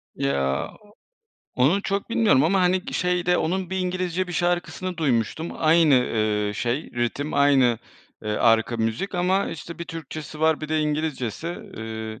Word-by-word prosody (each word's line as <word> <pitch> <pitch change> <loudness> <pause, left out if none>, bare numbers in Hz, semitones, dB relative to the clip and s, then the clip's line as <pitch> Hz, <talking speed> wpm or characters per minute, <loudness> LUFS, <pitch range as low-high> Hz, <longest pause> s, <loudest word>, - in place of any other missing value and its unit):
Ya, 70 -1 0
o 210 - -20 0.7
onu 155 +11 +3
çok 200 +3 -2
bilmiyorum 210 - +4
ama 190 +3 +3
hani, 180 +1 +2
g - - -7
şeyde 180 0 +1
onun 185 +2 -1
bir 190 - -2
İngilizce 185 0 -1
bir - - -5
şarkısını 175 +1 -1
duymuştum. 145 +2 0
Aynı, 160 -2 +4
ııı, 110 -4 +1
şey 120 +8 -2
ritim, 120 +5 -2
aynı, 135 -5 +4 0.4
eee, 105 - -3
arka 115 +1 +3
müzik 115 - -2
ama 185 +2 +1
işte, 165 +1 -8
bir 170 - -4
Türkçesi 155 -1 -8
var, 160 -1 +3
bir 155 - -5
de 155 0 +1
İngilizcesi, 150 -3 -2
ııı 110 -9 -6
155 Hz, 155 wpm, -24 LUFS, 120-180 Hz, 0.7 s, bilmiyorum